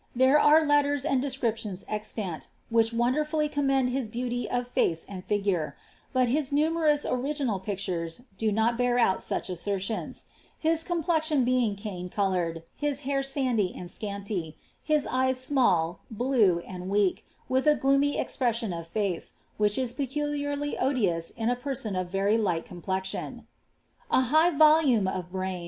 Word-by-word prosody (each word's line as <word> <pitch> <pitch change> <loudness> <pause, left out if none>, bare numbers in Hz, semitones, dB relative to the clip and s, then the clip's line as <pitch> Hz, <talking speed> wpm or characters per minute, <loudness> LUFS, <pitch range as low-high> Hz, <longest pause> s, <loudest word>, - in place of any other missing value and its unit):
There 260 +4 +5
are 310 +2 +6
letters 290 -1 +2
and 275 -4 +2
descriptions 230 -8 -2
eiiant, 210 -5 -4 0.2
which 225 -1 +4
wonderAilly 300 +6 0
commend 270 -3 +1
his 255 -3 -2
beauty 245 0 -3
of 245 0 -1
face 165 -9 0
and 185 -2 -8
figure; 195 -6 -1 0.3
but 255 -2 +2
hin 290 +6 +1
nnmermM 300 +1 +2
imginal 255 -5 -1
pictures 185 -2 -3
do 215 +2 0
not 225 +3 +1
bear 245 0 +2
out 190 -6 +3
such - - -2
assertions 195 +3 -3 0.2
— - - -29
his 325 0 +2
complexion 320 -5 +1
Iwiiw 245 -5 +1
cane 190 -4 -6
coloured, 180 -5 -1
his 290 -1 -1
hair 275 0 0
sandy 255 -8 0
and 180 0 -7
scanty 200 -6 -4
— - - -37
his 300 -2 +3
eyes 260 0 +1
small, 200 - +2
bluci 220 -7 +2
onit 180 -1 -7
weak, 200 -1 +1 0.2
with 260 +3 +1
9 300 - +5
gloomy 275 +1 +2
expression 230 -6 -1
of 165 -1 -6
face, 195 -2 -2 0.2
which 210 -1 +2
is 255 -2 -1
peculiarly 290 +1 -2
odious 200 -11 0
ia 225 - -3
■ 245 - -18
penon 245 -7 -2
of 180 - -7
very 200 +4 +1
light 175 -6 0
complexion. 190 +1 -4 0.6
A - - +4
mighty 310 +5 +3
volume 300 -9 +5
of 180 -1 -4
brarn. 185 -1 -3
240 Hz, 155 wpm, -27 LUFS, 195-280 Hz, 0.6 s, are